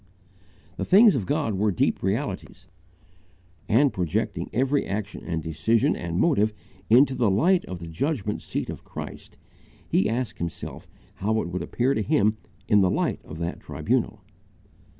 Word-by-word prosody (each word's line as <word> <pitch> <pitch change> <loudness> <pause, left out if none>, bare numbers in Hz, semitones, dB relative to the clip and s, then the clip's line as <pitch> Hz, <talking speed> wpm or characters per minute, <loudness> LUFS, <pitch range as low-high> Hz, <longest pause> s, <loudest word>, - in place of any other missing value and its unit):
The - - -2
things 205 +2 +7
of 105 -9 -2
God 110 - 0
were 105 0 +2
deep 90 - 0
realities, 95 -2 -3 1.0
and, 135 +5 +4
projecting 90 -4 -2
every 135 +3 +1
action 100 +1 -4
and 80 -3 -3
decision 80 +9 +1
and 85 -1 -4
motive 110 - +2 0.3
into 130 +4 +6
the 120 -4 +2
light 170 - +3
of 90 - -6
the 85 - -8
judgment 105 - -2
seat - - -3
of - - -9
Christ, - - -9 0.5
he 95 - +2
asked 120 0 -3
himself 85 -2 -6 0.3
how 110 +3 0
it 85 - -5
would 90 +1 -3
appear 130 +3 0
to 110 - 0
him 105 +2 +2 0.3
in 105 -1 +5
the 95 - +4
light - - -1
of 75 - -9
that 85 +1 -4
tribunal. - - -2
105 Hz, 155 wpm, -25 LUFS, 90-130 Hz, 1.0 s, things